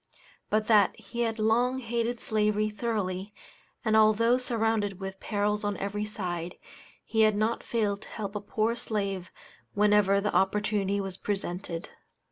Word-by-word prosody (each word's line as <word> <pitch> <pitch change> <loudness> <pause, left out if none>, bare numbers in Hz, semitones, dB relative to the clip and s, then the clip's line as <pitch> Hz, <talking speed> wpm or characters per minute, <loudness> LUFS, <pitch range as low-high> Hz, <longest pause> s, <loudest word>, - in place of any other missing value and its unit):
But 215 0 +2
that 210 -3 +4
he 235 - -8
had 225 -1 0
long 235 +4 +2
hated 235 -1 -2
slavery 215 -1 +1
thoroughly, 205 -2 -3 0.5
and 220 -1 +3
although 220 +3 +5
surrounded 225 -5 0
with 190 0 -6
perils 210 0 -1
on 205 -1 -1
every 205 +1 -2
side, 180 -4 -4 0.5
he 220 - +1
had 215 -1 +5
not 220 +2 0
failed 210 -3 -1
to - - -11
help 200 -2 -5
a 210 - -3
poor 220 +3 0
slave 200 -5 -3 0.4
whenever 205 -1 +4
the 210 +1 -1
opportunity 200 +1 +1
was 195 -1 -4
presented. 180 -4 -4
210 Hz, 145 wpm, -28 LUFS, 200-220 Hz, 0.5 s, although